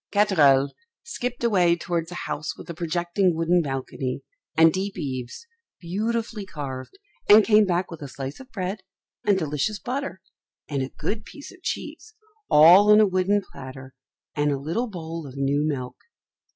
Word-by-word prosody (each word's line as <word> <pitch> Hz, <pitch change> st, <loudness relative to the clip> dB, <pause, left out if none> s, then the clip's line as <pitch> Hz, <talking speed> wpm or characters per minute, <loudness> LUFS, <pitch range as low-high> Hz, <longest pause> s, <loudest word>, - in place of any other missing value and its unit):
Katherl 145 Hz, -10 st, +4 dB, 0.3 s
skipped 250 Hz, -, -5 dB
away 180 Hz, -7 st, +4 dB
towards 170 Hz, -1 st, -3 dB
a -, -, -6 dB
house 150 Hz, +1 st, -4 dB
with -, -, -11 dB
a -, -, -6 dB
projecting 175 Hz, +2 st, 0 dB
wooden 170 Hz, +2 st, +2 dB
balcony, 135 Hz, -2 st, -4 dB, 0.3 s
and 160 Hz, 0 st, +6 dB
deep 195 Hz, +1 st, -3 dB
eaves, 130 Hz, -, -5 dB, 0.3 s
beautifully 220 Hz, +4 st, -2 dB
carved, 140 Hz, -, -7 dB, 0.3 s
and 210 Hz, +1 st, +9 dB
came 215 Hz, -1 st, +5 dB
back 180 Hz, 0 st, 0 dB
with 165 Hz, -, -9 dB
a 145 Hz, -, -5 dB
slice 135 Hz, +1 st, -7 dB
of 265 Hz, 0 st, -13 dB
bread 195 Hz, -1 st, -3 dB, 0.5 s
and 200 Hz, -2 st, +4 dB
delicious 155 Hz, +5 st, -1 dB
butter, 255 Hz, -3 st, -4 dB, 0.5 s
and 140 Hz, -2 st, -2 dB
a 130 Hz, -, -3 dB
good 210 Hz, +11 st, -4 dB
piece 285 Hz, +4 st, -11 dB
of 370 Hz, -, -17 dB
cheese, 435 Hz, +4 st, -5 dB, 0.3 s
all 175 Hz, +7 st, +8 dB
on 210 Hz, -, +8 dB
a 215 Hz, -, +7 dB
wooden 195 Hz, +1 st, +1 dB
platter, 130 Hz, -1 st, -10 dB, 0.4 s
and 145 Hz, 0 st, +1 dB
a 140 Hz, -, 0 dB
little 165 Hz, -, -2 dB
bowl 165 Hz, -5 st, -6 dB
of 135 Hz, 0 st, -11 dB
new 140 Hz, +2 st, +1 dB
milk. 135 Hz, -5 st, -3 dB
170 Hz, 165 wpm, -24 LUFS, 145-205 Hz, 0.5 s, and